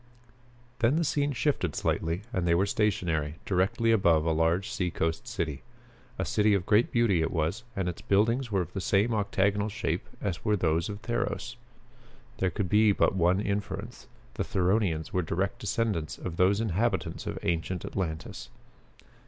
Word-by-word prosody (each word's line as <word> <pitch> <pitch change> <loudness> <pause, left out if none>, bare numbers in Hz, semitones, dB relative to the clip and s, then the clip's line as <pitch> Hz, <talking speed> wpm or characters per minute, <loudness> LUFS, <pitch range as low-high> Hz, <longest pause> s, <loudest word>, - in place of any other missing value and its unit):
Then 120 +4 +3
the 170 - +2
scene 145 -1 +1
shifted 125 - 0
slightly 85 +4 -1
and 90 -3 0
they 85 - +4
were 95 +3 +3
stationary, 90 - 0
directly 105 +5 +1
above 85 -8 +4
a 80 - +2
large 80 +4 +1
seacoast 80 -4 -2
city. 75 -4 -3 0.6
A - - -1
city 105 -1 +3
of 90 -3 -1
great 105 +3 +3
beauty 115 -8 +3
it 80 - +1
was, 80 +7 -1
and 95 -2 -1
its 90 - -4
buildings 115 +5 +1
were 95 -2 +2
of 90 - -6
the 95 - -3
same 105 +5 +2
octagonal 100 0 +1
shape 95 -6 -3
as 95 -4 -3
were 105 -1 +2
those 80 -1 +1
of 100 +1 -7
Theros! 120 0 -2 0.8
There 95 - +2
could 100 0 -2
be 105 +2 +5
but - - +2
one 90 +1 +3
inference 100 -1 -4 0.3
the - - -2
Theronians 90 -3 0
were 90 - +2
direct 95 +4 -2
descendants 105 -6 -1
of 85 -2 -6
those 95 +3 +3
inhabitants 115 +2 -1
of - - -3
ancient 85 +1 -1
Atlantis. 80 -5 -4
95 Hz, 165 wpm, -28 LUFS, 85-110 Hz, 0.8 s, be